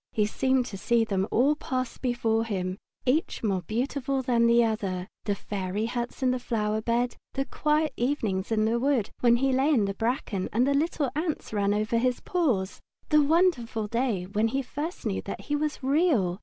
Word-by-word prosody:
He 210 - +2
seemed 260 +3 +1
to 195 -5 -7
see 235 +1 +2
them 195 -2 0
all 275 +6 +3
pass 255 -4 -3
before 230 -3 +1
him, 185 -3 -3 0.3
each 275 +2 0
more 195 -4 +1
beautiful 265 - -2
than 235 -2 +3
the 235 0 +5
other, 195 -5 -2 0.2
the 205 -2 0
fairy 200 +1 -3
huts 240 +2 -4
in 255 - +4
the 255 - -1
flower 220 -3 -1
bed, 240 +2 0 0.2
the 270 - -1
quiet 305 +1 0
evenings 225 -7 -1
in 215 -1 +2
the 230 +2 +1
wood 260 -5 +1
when 235 -1 +5
he 265 +2 +1
lay 265 +3 +3
in 245 -10 +3
the 195 - -2
bracken 225 -3 -2
and 240 +4 +2
the 280 - +2
little 290 -2 0
ants 315 -6 -3
ran 200 -1 +1
over 215 +2 +1
his 250 +1 +1
paws; 250 - -1 0.3
the 300 -1 +5
wonderful 290 - +2
day 230 -3 -1
when 210 +4 0
he 270 +4 -1
first 300 +7 -5
knew - - -1
that - - -6
he 295 - -2
was 300 -1 -2
Real. 265 - +2
235 Hz, 195 wpm, -27 LUFS, 215-275 Hz, 0.3 s, the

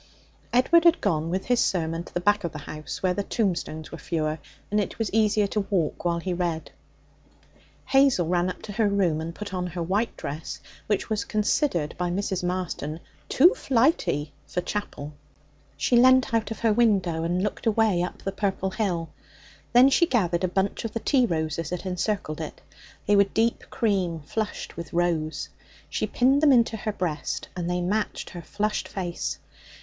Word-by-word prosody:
Edward 295 +7 +5
had 340 -1 +5
gone 165 -5 0
with 185 +2 -2
his 245 0 +2
sermon 165 -2 0
to - - -14
the - - -1
back 205 +3 +2
of 170 - -2
the - - -5
house 150 +1 -7
where 185 -1 +3
the 200 - -1
tombstones 180 -7 -2
were 165 - -7
fewer 155 0 -2 0.3
and 210 - +2
it 205 - -2
was 225 -3 -2
easier 215 -1 +3
to 200 0 -2
walk 175 -7 0
while 170 -1 +1
he 180 +2 -2
read. 170 -2 -2 1.1
Hazel 270 -9 +4
ran 175 +1 +1
up - - -7
to 210 - -7
her 215 +1 +2
room 180 -6 +1
and 165 +1 -5
put 210 -2 -7
on 180 -1 -2
her 175 0 -4
white 200 +7 -1
dress, 155 +3 -5 0.3
which 205 -2 0
was 215 - 0
considered 210 - 0
by 180 0 0
Mrs. 190 0 -2
Marston 175 -4 -3 0.3
'too 345 - +6
flighty' 235 - +1
for - - -2
chapel. 165 -8 -5 0.6
She 245 - +2
leant 255 0 +5
out 225 -2 +1
of 225 - -6
her 225 -2 +3
window 195 -8 +2
and 175 +3 0
looked 210 +2 -3
away 215 -5 +3
up 180 - -4
the 195 - -2
purple 195 -1 -1
hill. 180 -6 -1 0.6
Then 250 +3 +7
she 340 +5 +4
gathered 180 - +1
a - - +3
bunch 190 +2 -1
of 225 - -4
the 230 - -1
tea 255 +1 +3
roses 160 -2 -2
that 180 +1 -4
encircled 180 -3 -2
it. 155 - -6 0.5
They 205 - +4
were 200 0 +6
deep 225 +4 0
cream 185 -7 0
flushed 210 +8 -4
with 170 -1 -8
rose. 170 -3 0 0.4
She - - -1
pinned 265 +3 +3
them 305 -2 +6
into 235 -3 +4
her 215 0 -3
breast, 170 -7 -3
and 175 -1 -3
they 180 0 0
matched 205 +4 -2
her 175 - -7
flushed 210 +4 -2
face. 175 -3 -3
190 Hz, 185 wpm, -26 LUFS, 170-220 Hz, 1.1 s, Then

